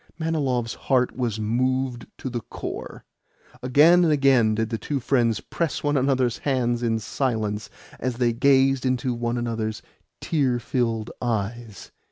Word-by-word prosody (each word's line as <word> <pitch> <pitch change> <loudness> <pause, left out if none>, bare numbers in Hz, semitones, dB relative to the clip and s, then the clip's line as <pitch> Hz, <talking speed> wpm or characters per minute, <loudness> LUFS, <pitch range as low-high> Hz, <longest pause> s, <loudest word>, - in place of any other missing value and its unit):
Manilov's 140 -8 -1
heart 125 -2 0
was 120 -4 -2
moved 125 +3 -1
to - - -6
the 120 -2 -2
core. - - -7 0.6
Again 150 +8 +5
and 165 - +3
again 135 -7 +4
did 110 0 -1
the 115 - -2
two 145 -2 -2
friends 120 -3 +1
press 170 -2 -3
one 145 0 +1
another's 130 -3 +1
hands 120 -4 0
in 115 -2 +1
silence 110 -3 -2 0.3
as 130 0 -2
they 120 -2 +2
gazed 135 +1 +3
into 130 -1 0
one 120 0 -2
another's 110 -2 -3 0.4
tear 135 -6 +1
filled 115 -2 -2
eyes. 115 -2 -3
125 Hz, 145 wpm, -24 LUFS, 115-135 Hz, 0.6 s, Again